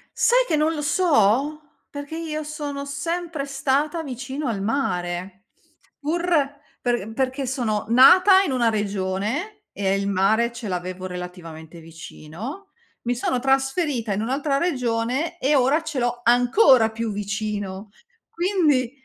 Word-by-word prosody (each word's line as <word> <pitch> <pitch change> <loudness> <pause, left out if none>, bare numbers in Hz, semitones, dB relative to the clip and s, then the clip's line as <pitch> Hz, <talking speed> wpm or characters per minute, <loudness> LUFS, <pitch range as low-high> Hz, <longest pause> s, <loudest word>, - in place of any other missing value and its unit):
Sai - - +4
che - - +1
non 305 +2 +2
lo 300 - -4
so? 290 - +2 0.3
Perché 285 +2 -7
io 310 -2 -4
sono 295 -2 -5
sempre 315 +2 -3
stata 285 +4 -1
vicino 265 +1 -5
al 205 -4 -2
mare, 190 -4 -3 0.5
pur 325 +4 -2 0.6
per 240 -4 -1
perché 265 +2 -1
sono 240 -5 -2
nata 365 - +7
in 320 - -2
una 240 -3 +2
regione 210 - -3
e 195 -1 0
il 200 0 -2
mare 200 +5 +2
ce 235 -1 -7
l'avevo 185 0 -4
relativamente 175 -3 -8
vicino. 165 - -9 0.3
Mi 245 +1 -1
sono 250 +1 -1
trasferita 270 - 0
in 200 - -2
un'altra 275 +4 0
regione 260 +1 -1
e 285 +3 +2
ora 275 +4 +3
ce 315 -4 -4
l'ho 240 0 -1
ancora 245 - +5
più 225 0 -3
vicino. 205 -1 -4 0.4
Quindi 330 - +1
255 Hz, 130 wpm, -23 LUFS, 210-295 Hz, 0.6 s, nata